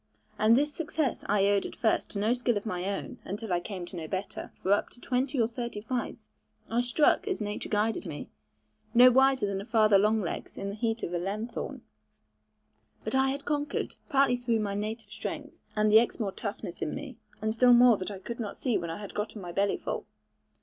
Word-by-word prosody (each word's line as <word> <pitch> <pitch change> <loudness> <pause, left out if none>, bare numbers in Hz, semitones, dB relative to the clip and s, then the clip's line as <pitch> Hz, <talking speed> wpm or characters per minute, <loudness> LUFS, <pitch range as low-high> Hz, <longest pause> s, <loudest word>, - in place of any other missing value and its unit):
And 220 +2 +6
this 295 +2 +1
success 305 -5 -1
I 200 -1 +4
owed 200 -1 +3
at - - -10
first 220 - +1
to - - -6
no 215 +4 +3
skill 245 -2 +1
of 205 - -5
my 180 -4 -2
own; 200 0 -4
until 205 0 -4
I 175 - +2
came 185 -1 -6
to 175 - -10
know 165 -2 -5
better; 190 +4 -4
for 190 - -2
up 205 - +1
to - - -14
twenty 260 +2 -1
or 225 - +4
thirty 235 -2 -5
fights, 240 +3 -4 0.4
I 235 +1 +3
struck 295 - +3
as 390 - -1
nature 205 0 -4
guided 215 -1 0
me, 150 -3 -6 0.7
no 250 +1 +9
wiser 265 -2 +4
than 195 -1 -2
a - - -6
father 215 -2 +4
long 215 +2 +3
legs 185 - -4
in 195 - -3
the 200 - -5
heat 225 +1 -1
of 175 - -3
a 175 - 0
lanthorn; 210 +6 -4 1.2
but - - -3
I 265 0 +3
had 280 +1 -4
conquered, 295 0 -1 0.2
partly 275 -4 +4
through 235 -2 0
my 200 -1 -2
native 215 +1 -4
strength, - - -5 0.2
and 215 0 +3
the 220 - +9
Exmoor 225 -3 -1
toughness - - -6
in - - -2
me, - - -7 0.2
and 220 0 -1
still 245 +2 +5
more 240 -2 +7
that 185 - -4
I 200 - -6
could 230 +5 -7
not 210 -4 -4
see 240 -7 +1
when 170 -1 -4
I 165 - -4
had 205 -1 -8
gotten 210 +1 -3
my 175 -3 -6
bellyful. 200 +3 -1
220 Hz, 215 wpm, -29 LUFS, 200-245 Hz, 1.2 s, no